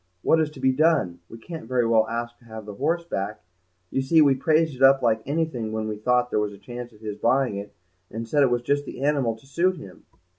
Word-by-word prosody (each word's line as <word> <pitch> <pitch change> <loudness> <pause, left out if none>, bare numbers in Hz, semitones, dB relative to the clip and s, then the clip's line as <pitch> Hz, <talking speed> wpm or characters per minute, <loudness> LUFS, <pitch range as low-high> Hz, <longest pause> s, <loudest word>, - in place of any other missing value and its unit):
What 160 - +4
is 155 - 0
to 135 - -12
be 130 0 +3
done? 140 - +2
We 115 - -10
can't 160 +1 -9
very 125 -1 +1
well 110 -1 +3
ask 120 0 -4
to 120 - -23
have 110 -2 -9
the 105 - -7
horse 170 +11 -1
back; 105 - -4 0.5
you 135 - 0
see, 145 +5 +3
we 145 -3 +6
praised 155 +2 +1
it 130 - -12
up 135 0 +6
like 110 -2 +2
anything 145 -7 -2
when 110 0 -3
we 105 - -3
thought 125 +3 +1
there - - +1
was 105 -1 -2
a - - -12
chance 120 +3 -8
of 105 -1 -20
his 105 -2 -6
buying 125 -3 +2
it, 100 +1 -8 0.3
and 115 +1 -6
said 145 +5 +2
it 135 - +5
was 120 0 0
just 145 +3 0
the 135 - -7
animal 140 -6 +1
to 110 - -20
suit 175 +6 0
him." 95 - -12
125 Hz, 255 wpm, -24 LUFS, 110-145 Hz, 0.5 s, we